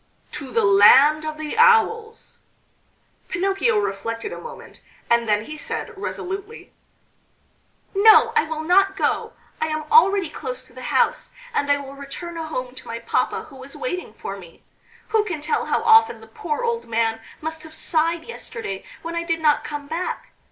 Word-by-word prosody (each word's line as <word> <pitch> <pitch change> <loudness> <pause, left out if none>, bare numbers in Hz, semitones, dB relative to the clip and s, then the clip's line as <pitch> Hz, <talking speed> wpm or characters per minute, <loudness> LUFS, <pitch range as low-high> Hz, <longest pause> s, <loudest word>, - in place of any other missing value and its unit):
"To 290 -3 -6
the 230 -4 +1
Land 270 +10 +6
of 310 0 -4
the 310 -1 -5
Owls." 455 -1 +3 0.9
Pinocchio 390 +5 +1
reflected 230 - -3
a - - -8
moment, 475 0 -11 0.3
and 235 -1 +3
then 210 0 +2
he 305 +3 -8
said - - -4
resolutely: 395 +2 -6 1.2
"No, 440 +3 +6
I 455 - +5
will 315 0 -4
not 390 +3 +3
go. - - -1 0.3
I 315 - +1
am 310 0 -3
already 400 -5 +5
close 255 -4 -7
to 255 - -15
the 255 - -10
house, - - +1 0.2
and 285 -10 +1
I 285 - +4
will 275 -1 -8
return 280 +5 -8
home 310 -6 -5
to 260 - -13
my 230 - -4
papa 230 0 -1
who 270 -4 -14
is 270 +2 -10
waiting 365 - -5
for 195 - -6
me. 175 -4 -15 0.5
Who 435 -1 +3
can 350 -7 -4
tell 300 +1 -1
how - - 0
often 450 0 +5
the - - -13
poor 410 -4 -4
old 470 0 -1
man 225 0 0 0.2
must 320 0 -4
have 315 0 -11
sighed 330 +1 0
yesterday 455 - -7 0.2
when 330 +1 -5
I 335 - -1
did 335 -1 -1
not 300 -1 +3
come 295 -1 -6
back! 330 +5 -4
315 Hz, 175 wpm, -22 LUFS, 270-395 Hz, 1.2 s, Land